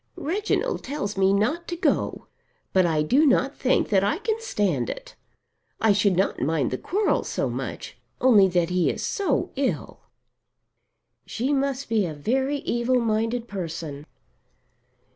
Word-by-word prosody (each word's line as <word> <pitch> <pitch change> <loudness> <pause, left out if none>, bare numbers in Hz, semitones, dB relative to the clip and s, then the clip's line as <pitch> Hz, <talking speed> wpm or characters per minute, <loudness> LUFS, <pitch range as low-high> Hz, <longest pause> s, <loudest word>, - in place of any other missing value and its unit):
"Reginald 420 +8 -1
tells 275 -7 -4
me 195 0 +3
not 240 +13 0
to 345 - -3
go, 340 - 0 0.5
but 185 -2 +4
I 155 -2 +1
do 260 - +3
not 275 -1 +3
think 260 - +1
that 195 -2 +3
I 285 +10 +1
can 440 +2 -2
stand 195 - -1
it. - - -7 0.7
I 220 -2 +4
should 200 -2 +2
not 195 - 0
mind 145 -3 0
the 130 - -3
quarrel 405 +3 0
so - - -2
much, - - -6 0.2
only 220 -7 +6
that 175 -1 0
he 180 -1 +2
is - - -3
so 385 -9 -1
ill." 275 0 -2 1.3
"She 260 +5 -1
must 275 0 -1
be 220 -5 +1
a 155 - -6
very 265 - -1
evil 240 +2 +1
minded 230 +1 -1
person." 165 -6 -6
230 Hz, 150 wpm, -25 LUFS, 185-280 Hz, 1.3 s, only